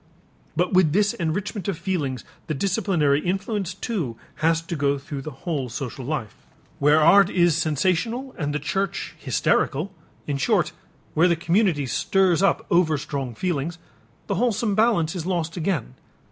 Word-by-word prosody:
But 180 Hz, +3 st, 0 dB
with 180 Hz, -5 st, +4 dB
this 205 Hz, +2 st, +3 dB
enrichment 190 Hz, +3 st, -3 dB
of 195 Hz, -, -1 dB
feelings 145 Hz, -, -2 dB, 0.2 s
the 155 Hz, -, -2 dB
disciplinary 175 Hz, -5 st, +1 dB
influence 190 Hz, +2 st, -2 dB
too 175 Hz, -, -3 dB, 0.2 s
has 165 Hz, +1 st, +2 dB
to 170 Hz, -, -4 dB
go 140 Hz, -1 st, +1 dB
through 140 Hz, 0 st, -6 dB
the 155 Hz, -, -6 dB, 0.2 s
whole 145 Hz, -7 st, -1 dB
social 130 Hz, +1 st, -5 dB
life. 120 Hz, -7 st, -3 dB, 0.5 s
Where 145 Hz, +2 st, +5 dB
art 185 Hz, +5 st, +6 dB
is 175 Hz, -4 st, +3 dB
sensational 185 Hz, -, 0 dB
and 145 Hz, -3 st, -2 dB
the 150 Hz, -, 0 dB
church 195 Hz, +4 st, -2 dB
hysterical, 160 Hz, +9 st, 0 dB, 0.3 s
in 145 Hz, -2 st, -2 dB
short, 135 Hz, -, +2 dB, 0.4 s
where 165 Hz, +3 st, +4 dB
the 170 Hz, -, +3 dB
community 170 Hz, -3 st, +1 dB
stirs 180 Hz, +8 st, +2 dB
up 195 Hz, -, +2 dB
overstrong 145 Hz, -7 st, +1 dB
feelings, 170 Hz, +1 st, -2 dB, 0.5 s
the -, -, -2 dB
wholesome 230 Hz, -3 st, +1 dB
balance 200 Hz, -7 st, +2 dB
is 175 Hz, -1 st, -4 dB
lost 165 Hz, -3 st, -1 dB
again. 165 Hz, -, -2 dB
170 Hz, 150 wpm, -24 LUFS, 145-195 Hz, 0.5 s, art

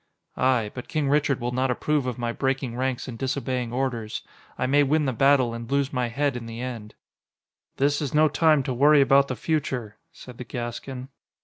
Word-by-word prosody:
"Aye. 125 Hz, -5 st, +1 dB
But 125 Hz, -, -7 dB
King 150 Hz, -3 st, -1 dB
Richard 145 Hz, -2 st, +2 dB
will 120 Hz, 0 st, -2 dB
not 130 Hz, +1 st, 0 dB
approve 140 Hz, +2 st, 0 dB
of 125 Hz, -, -3 dB
my 120 Hz, -1 st, -2 dB
breaking 135 Hz, -1 st, -2 dB
ranks 130 Hz, 0 st, -2 dB
and 115 Hz, -3 st, -7 dB
disobeying 130 Hz, -2 st, -2 dB
orders. 120 Hz, -4 st, -3 dB, 0.3 s
I -, -, 0 dB
may 140 Hz, +3 st, +4 dB
win 150 Hz, +2 st, +2 dB
the 130 Hz, -, 0 dB
battle 135 Hz, -1 st, +3 dB
and 115 Hz, 0 st, -7 dB
lose 140 Hz, -1 st, +1 dB
my 125 Hz, -2 st, 0 dB
head 140 Hz, +3 st, -1 dB
in 120 Hz, -2 st, -6 dB
the 115 Hz, 0 st, -7 dB
end." 120 Hz, -4 st, -6 dB, 0.8 s
"This 145 Hz, +2 st, +1 dB
is 145 Hz, -, -2 dB
no 155 Hz, +1 st, +4 dB
time 155 Hz, 0 st, +3 dB
to 130 Hz, -, -2 dB
worry 145 Hz, +3 st, +5 dB
about 140 Hz, 0 st, +5 dB
the 130 Hz, -, -3 dB
future," 125 Hz, -5 st, -2 dB
said 125 Hz, -2 st, -13 dB
the -, -, -4 dB
Gascon. 125 Hz, +2 st, -6 dB
130 Hz, 200 wpm, -25 LUFS, 120-140 Hz, 0.8 s, worry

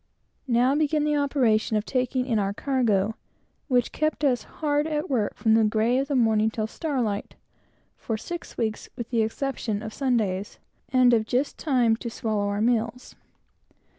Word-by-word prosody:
Now 250 Hz, +2 st, +3 dB
began 300 Hz, 0 st, +1 dB
the 300 Hz, 0 st, +1 dB
operation 250 Hz, -7 st, +2 dB
of 210 Hz, -, -2 dB
taking 255 Hz, 0 st, 0 dB
in 230 Hz, -4 st, +1 dB
our 200 Hz, 0 st, 0 dB
cargo, 225 Hz, -7 st, +1 dB, 0.5 s
which 250 Hz, -4 st, +2 dB
kept 310 Hz, -1 st, -1 dB
us 255 Hz, -4 st, +2 dB
hard 295 Hz, 0 st, -1 dB
at 305 Hz, -1 st, -2 dB
work, 220 Hz, -6 st, 0 dB
from 220 Hz, -, +2 dB
the 225 Hz, 0 st, +5 dB
grey 220 Hz, +4 st, +2 dB
of 275 Hz, -, -1 dB
the 285 Hz, -, -1 dB
morning 220 Hz, -3 st, +3 dB
till 220 Hz, -1 st, -2 dB
star 275 Hz, +2 st, -2 dB
light, 205 Hz, -2 st, -3 dB, 0.6 s
for 225 Hz, -, -3 dB
six 345 Hz, +10 st, -7 dB
weeks, 220 Hz, -2 st, -2 dB
with 235 Hz, 0 st, -6 dB
the 230 Hz, -2 st, +2 dB
exception 220 Hz, -2 st, -2 dB
of 220 Hz, -1 st, -6 dB
Sundays, 215 Hz, -8 st, -1 dB, 0.3 s
and 255 Hz, -2 st, +5 dB
of 220 Hz, -2 st, +2 dB
just 260 Hz, +4 st, -1 dB
time 245 Hz, -7 st, +2 dB
to 235 Hz, -, -5 dB
swallow 215 Hz, -3 st, -2 dB
our 205 Hz, +1 st, -1 dB
meals. 235 Hz, +1 st, 0 dB
240 Hz, 170 wpm, -25 LUFS, 220-275 Hz, 0.6 s, the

